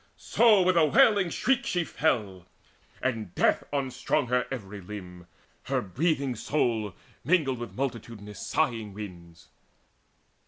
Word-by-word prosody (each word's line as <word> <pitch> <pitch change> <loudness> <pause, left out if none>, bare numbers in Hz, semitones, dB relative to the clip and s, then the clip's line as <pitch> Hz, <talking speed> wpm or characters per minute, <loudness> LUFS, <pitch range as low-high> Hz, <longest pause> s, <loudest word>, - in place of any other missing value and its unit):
So 215 -5 +4
with 180 -1 +3
a 160 - +6
wailing 195 +5 +5
shriek 265 +8 +1
she 175 -1 0
fell, 105 - -1 0.6
and 110 -8 -2
death - - +3
Unstrung 135 -3 -1
her 125 0 +1
every 105 -6 -6
limb: 90 -3 -9 0.4
her - - 0
breathing 135 - -1
soul 110 - -1 0.3
Mingled 140 -5 +2
with 120 - -7
multitudinous 115 -5 -5
sighing 115 -10 0
winds. 85 -5 -10
120 Hz, 120 wpm, -28 LUFS, 105-155 Hz, 0.6 s, a